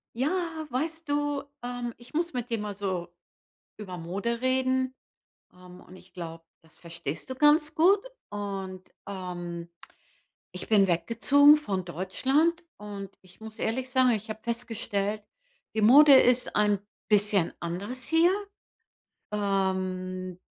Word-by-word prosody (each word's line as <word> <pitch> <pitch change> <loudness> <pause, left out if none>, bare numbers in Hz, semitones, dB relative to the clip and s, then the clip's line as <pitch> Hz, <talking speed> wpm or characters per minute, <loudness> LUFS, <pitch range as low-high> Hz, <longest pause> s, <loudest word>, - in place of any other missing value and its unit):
Ja, 320 +3 -1
weißt 320 +5 -3
du, 290 -1 0 0.2
ähm, 245 -1 -4
ich 240 +4 -16
muss 340 +1 -1
mit 245 -1 -4
dir 230 - 0
mal 210 -1 -5
so 185 -3 -3 0.6
über 185 -4 -7
Mode 200 +8 -3
reden, 260 0 +1 0.6
ähm, 180 0 -14
und 185 - -15
ich 185 0 -18
glaube, 165 -2 -7 0.2
das 160 -1 -20
verstehst 170 - -6
du - - -2
ganz 300 +3 +4
gut 365 +5 +5 0.3
und 195 -2 -5 0.2
ähm, 175 -3 -6 0.8
ich 180 - -7
bin 205 -3 +5
weggezogen 270 - +5
von 195 -11 -3
Deutschland 270 - 0
und 200 -2 -7
ich 185 +1 -20
muss 220 0 -10
ehrlich 255 +3 -2
sagen, 255 0 +4
ich 220 -1 -2
habe 215 0 -6
festgestellt, 215 -3 -2 0.5
die 220 - 0
Mode 280 +6 +8
ist 250 -1 +4
ein 210 -1 +3 0.3
bisschen 205 -4 +3
anders 200 +10 -5
hier. 325 +2 +4 1.0
Ähm, 185 -2 -2
215 Hz, 130 wpm, -28 LUFS, 185-260 Hz, 1.0 s, Mode